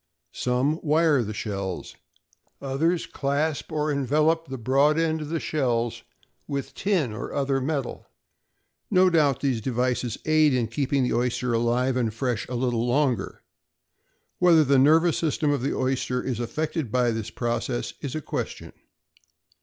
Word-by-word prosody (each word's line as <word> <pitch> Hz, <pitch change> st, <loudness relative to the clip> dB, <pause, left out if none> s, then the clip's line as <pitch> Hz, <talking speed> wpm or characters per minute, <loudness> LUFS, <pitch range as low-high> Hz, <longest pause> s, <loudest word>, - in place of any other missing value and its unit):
Some 130 Hz, +6 st, 0 dB
wire 155 Hz, -2 st, +3 dB
the 110 Hz, -2 st, -4 dB
shells, 100 Hz, -3 st, -5 dB, 0.6 s
others 160 Hz, +6 st, 0 dB
clasp 140 Hz, -2 st, -2 dB
or 155 Hz, -1 st, 0 dB
envelope 155 Hz, +4 st, +1 dB
the 130 Hz, -, -5 dB
broad 135 Hz, +6 st, +3 dB
end 160 Hz, -1 st, +1 dB
of 150 Hz, -, -6 dB
the 165 Hz, 0 st, -1 dB
shells 120 Hz, -7 st, -1 dB, 0.5 s
with 140 Hz, -1 st, -4 dB
tin 170 Hz, -, 0 dB
or 105 Hz, -, -6 dB
other 135 Hz, -1 st, 0 dB
metal. 140 Hz, -1 st, -3 dB, 0.8 s
No 185 Hz, 0 st, +4 dB
doubt 150 Hz, -5 st, +2 dB
these 130 Hz, -5 st, 0 dB
devices 125 Hz, -1 st, -1 dB
aid 155 Hz, -3 st, +4 dB
in 120 Hz, -3 st, 0 dB
keeping 135 Hz, +2 st, 0 dB
the 125 Hz, -, 0 dB
oyster 125 Hz, 0 st, 0 dB
alive 120 Hz, +3 st, +1 dB
and 115 Hz, -3 st, 0 dB
fresh 120 Hz, 0 st, -2 dB
a 125 Hz, -, -3 dB
little 120 Hz, -1 st, 0 dB
longer. 130 Hz, 0 st, 0 dB, 1.0 s
Whether 170 Hz, -3 st, +6 dB
the 140 Hz, -1 st, +3 dB
nervous 160 Hz, +5 st, +4 dB
system 155 Hz, -2 st, 0 dB
of 140 Hz, -3 st, 0 dB
the 135 Hz, -, -1 dB
oyster 130 Hz, -1 st, -1 dB
is 125 Hz, -4 st, -3 dB
affected 150 Hz, +1 st, -3 dB
by 125 Hz, -1 st, +2 dB
the 110 Hz, -2 st, -4 dB
process, 120 Hz, 0 st, -2 dB
is 140 Hz, -1 st, -4 dB
a 155 Hz, -, -2 dB
question. -, -, -5 dB
135 Hz, 150 wpm, -25 LUFS, 120-155 Hz, 1.0 s, Whether